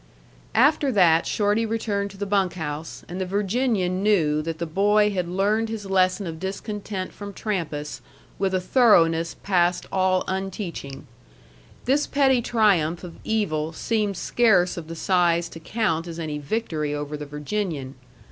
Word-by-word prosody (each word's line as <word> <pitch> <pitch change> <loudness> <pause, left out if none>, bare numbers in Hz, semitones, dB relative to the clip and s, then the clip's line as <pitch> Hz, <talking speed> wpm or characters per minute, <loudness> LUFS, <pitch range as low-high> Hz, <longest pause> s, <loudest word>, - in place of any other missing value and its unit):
After 285 +2 +4
that 170 -5 +4
Shorty 210 +2 +1
returned 215 -3 -1
to 195 - -13
the 205 - -3
bunk 195 -2 +1
house, 155 -1 -6
and 180 +2 -5
the - - 0
Virginian 200 -2 0
knew 165 -8 +2
that 165 +1 -4
the 170 - -3
boy 205 +5 +3
had 180 -3 -2
learned 205 +5 +1
his 220 -2 -5
lesson 190 0 +2
of 160 -2 -6
discontent 195 0 -5
from 200 -1 -8
Trampas 160 -9 -3 0.4
with 190 -1 +1
a - - +2
thoroughness 170 -6 +3
past 180 -2 +2
all 185 -1 +2
unteaching. 185 -8 -5 0.8
This 280 +4 +2
petty 265 -3 +3
triumph 190 -9 +2
of 175 -2 -9
evil 160 -8 -1
seemed 210 +1 -1
scarce 195 -7 +3
of 170 -3 -7
the 165 - -6
size 170 -1 +2
to 165 - -10
count 165 -3 -1
as 165 -1 -7
any 155 -3 -4
victory 150 -3 -2
over 145 0 -4
the 150 0 -7
Virginian. 150 -2 -3
185 Hz, 155 wpm, -24 LUFS, 165-210 Hz, 0.8 s, After